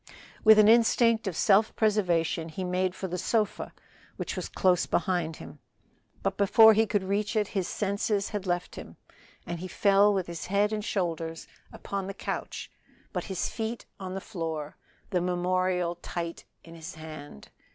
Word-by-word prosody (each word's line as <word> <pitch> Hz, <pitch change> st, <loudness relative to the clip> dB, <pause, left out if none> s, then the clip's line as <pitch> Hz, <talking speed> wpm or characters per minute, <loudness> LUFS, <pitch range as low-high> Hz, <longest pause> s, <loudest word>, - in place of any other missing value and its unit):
With 220 Hz, -1 st, +8 dB
an 210 Hz, -1 st, +7 dB
instinct 230 Hz, -1 st, +4 dB
of 185 Hz, -, -2 dB
self 210 Hz, +4 st, +3 dB
preservation 175 Hz, -6 st, +1 dB
he 175 Hz, +4 st, -5 dB
made 185 Hz, 0 st, -1 dB
for 190 Hz, -, -4 dB
the 180 Hz, 0 st, -4 dB
sofa, 215 Hz, +1 st, -1 dB, 0.5 s
which -, -, -4 dB
was -, -, -4 dB
close 180 Hz, -2 st, +2 dB
behind 175 Hz, -2 st, 0 dB
him, 80 Hz, -, -11 dB, 0.6 s
but -, -, -1 dB
before 220 Hz, +2 st, +7 dB
he 220 Hz, +1 st, +3 dB
could 205 Hz, -2 st, 0 dB
reach 200 Hz, +3 st, -1 dB
it 210 Hz, -2 st, +1 dB
his 190 Hz, -4 st, -2 dB
senses 200 Hz, 0 st, -1 dB
had 205 Hz, -3 st, -4 dB
left 175 Hz, 0 st, -2 dB
him, -, -, -10 dB, 0.5 s
and 170 Hz, -1 st, -5 dB
he 185 Hz, -, -5 dB
fell 200 Hz, +2 st, +4 dB
with 190 Hz, -3 st, 0 dB
his 170 Hz, -2 st, -6 dB
head 205 Hz, +2 st, +2 dB
and 210 Hz, -1 st, -2 dB
shoulders 165 Hz, -5 st, -3 dB, 0.2 s
upon 195 Hz, -1 st, -5 dB
the 195 Hz, -, -6 dB
couch -, -, -5 dB, 0.4 s
but -, -, -3 dB
his 190 Hz, -3 st, -2 dB
feet 225 Hz, +1 st, -4 dB
on 190 Hz, -1 st, -5 dB
the -, -, -2 dB
floor, 160 Hz, -7 st, -5 dB, 0.4 s
the 180 Hz, -3 st, +1 dB
memorial 180 Hz, 0 st, 0 dB
tight 170 Hz, -1 st, -6 dB, 0.2 s
in 165 Hz, -, -13 dB
his 165 Hz, +2 st, -9 dB
hand. 155 Hz, -, -10 dB
185 Hz, 170 wpm, -28 LUFS, 170-210 Hz, 0.6 s, With